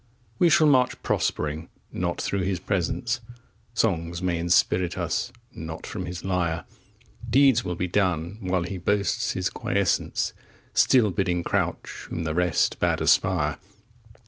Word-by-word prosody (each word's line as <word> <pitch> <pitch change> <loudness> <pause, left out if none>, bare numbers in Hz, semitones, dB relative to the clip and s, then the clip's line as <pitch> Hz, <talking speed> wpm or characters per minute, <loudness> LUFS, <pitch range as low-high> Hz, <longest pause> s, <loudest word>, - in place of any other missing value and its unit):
We 175 - +5
shall 165 -1 +5
march 130 -4 +3
prospering 75 +2 -1 0.2
not 85 -1 -2
through 100 - -1
his 95 -1 -1
presence; 120 +8 -1 0.5
Songs 85 -6 0
may 90 -2 -1
inspirit 85 +1 +2
us - - -1 0.2
not 80 0 -7
from - - -5
his 90 +1 -6
lyre; 85 -3 -1 0.6
Deeds 135 -3 +5
will 90 -1 -3
be 90 +2 -2
done 90 -1 0
while 90 -2 0
he 90 +2 -5
boasts 100 +3 0
his - - -1
quiescence, - - 0 0.4
Still 115 -6 +4
bidding 90 -2 0
crouch - - -2
whom 85 - -3
the 80 -1 -2
rest 90 +1 +1
bade - - +1
aspire. - - +2
90 Hz, 140 wpm, -25 LUFS, 85-100 Hz, 0.6 s, We